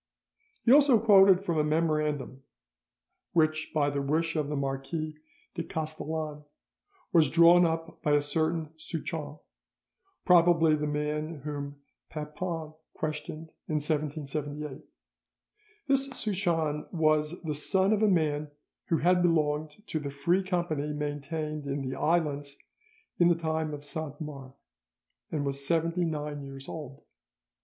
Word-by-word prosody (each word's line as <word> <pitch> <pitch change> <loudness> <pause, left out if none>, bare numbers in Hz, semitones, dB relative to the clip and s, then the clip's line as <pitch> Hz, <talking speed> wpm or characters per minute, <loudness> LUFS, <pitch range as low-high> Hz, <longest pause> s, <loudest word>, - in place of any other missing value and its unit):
He 235 - +5
also 280 -4 +7
quoted 195 -3 +6
from 170 -5 0
a - - +3
memorandum 150 -3 0 0.9
which 155 -2 +2
by 145 -2 +1
the 140 0 -1
wish 160 +4 0
of 150 -2 -1
the 150 - -2
Marquis 140 +3 -3 0.4
de 175 - -3
Castellane 155 -1 -4 0.7
was 160 -5 +5
drawn 170 +2 +7
up 165 0 -4
by 150 - +2
a 145 - +4
certain 160 +1 -1
Souchon, 155 -2 -5 0.9
probably 170 -3 +5
the 150 0 0
man 150 +1 -2
whom 145 -1 -6 0.3
Papon 155 +1 -5 0.2
questioned 155 +1 -5 0.2
in 155 - -2
1778. 150 -1 -2 1.1
This 275 0 +3
Souchon 175 - -1
was 155 -1 +1
the 155 -2 -2
son 190 +7 +2
of 215 - +1
a 215 - +5
man 155 -5 +1 0.4
who 165 - +2
had 180 +3 +3
belonged 155 +1 0
to 160 - -2
the 145 -1 -4
Free 140 +7 +1
Company 170 -6 -1
maintained 150 +1 -4
in 140 -1 -2
the 130 - -3
islands 145 -3 0 0.6
in 175 - +6
the 175 - +4
time 160 -1 -2
of 145 0 -7
Saint 150 0 -5
Mars, 140 -4 -8 0.8
and 145 -2 -1
was 140 0 -2
seventy 165 +3 +1
nine 150 -2 -3
years 135 0 -9
old. 140 -4 -8
155 Hz, 130 wpm, -29 LUFS, 145-165 Hz, 1.1 s, also